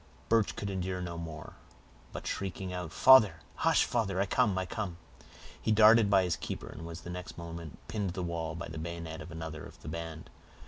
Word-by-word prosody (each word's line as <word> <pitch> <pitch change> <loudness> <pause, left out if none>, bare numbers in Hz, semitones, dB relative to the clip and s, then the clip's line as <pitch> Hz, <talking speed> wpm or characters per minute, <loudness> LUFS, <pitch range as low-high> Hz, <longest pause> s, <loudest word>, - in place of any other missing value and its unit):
Birch 115 -2 +3
could 100 -1 -3
endure 95 -1 -2
no 85 -1 -4
more, 80 -2 -7 0.5
but - - -7
shrieking 95 -1 -3
out,— 90 -3 -4
"Father! 105 -11 +7 0.2
hush—father! 100 -6 +2
I 100 - +3
come—I 95 -4 +2
come!" 95 -3 -4 0.6
he - - +1
darted 110 0 +7
by 95 -2 +5
his 90 -2 0
keeper - - -5
and 80 +2 -8
was 85 0 -7
the 90 - -7
next 90 0 -7
moment 85 -3 -7
pinned 105 -3 -2
to - - -5
the 90 - -2
wall 80 -2 -3
by 85 - -5
the 80 0 -6
bayonet 85 0 -5
of - - -9
another 80 -2 -6
of - - -12
the - - -9
band. 80 0 -6
90 Hz, 195 wpm, -31 LUFS, 80-100 Hz, 0.6 s, Father